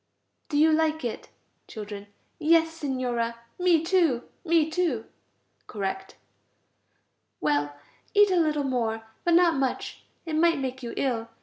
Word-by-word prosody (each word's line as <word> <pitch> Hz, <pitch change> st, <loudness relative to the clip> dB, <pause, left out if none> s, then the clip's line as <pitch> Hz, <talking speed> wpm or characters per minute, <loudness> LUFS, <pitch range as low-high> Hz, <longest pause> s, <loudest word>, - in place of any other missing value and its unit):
Do 290 Hz, -, 0 dB
you 315 Hz, +2 st, +5 dB
like 315 Hz, -2 st, +1 dB
it? 235 Hz, -, -5 dB, 0.4 s
Children. 205 Hz, -2 st, -8 dB, 0.3 s
Yes, 325 Hz, +1 st, +4 dB
Signora. 250 Hz, -6 st, -2 dB, 0.2 s
Me 350 Hz, -3 st, +3 dB
too, 330 Hz, -9 st, +2 dB, 0.2 s
me 330 Hz, -3 st, +3 dB
too 315 Hz, -9 st, -1 dB, 0.6 s
(correct). 195 Hz, -2 st, -4 dB, 1.2 s
Well, 145 Hz, -1 st, 0 dB, 0.4 s
eat 410 Hz, -1 st, +6 dB
a -, -, +3 dB
little 305 Hz, -4 st, +2 dB
more, 230 Hz, -4 st, -1 dB, 0.2 s
but 345 Hz, -1 st, +3 dB
not 340 Hz, -3 st, +4 dB
much, 265 Hz, -2 st, -2 dB, 0.2 s
it 320 Hz, -2 st, -3 dB
might 335 Hz, +1 st, +4 dB
make 265 Hz, -1 st, -4 dB
you 235 Hz, -2 st, -6 dB
ill. 235 Hz, -4 st, -1 dB
290 Hz, 130 wpm, -26 LUFS, 235-330 Hz, 1.2 s, eat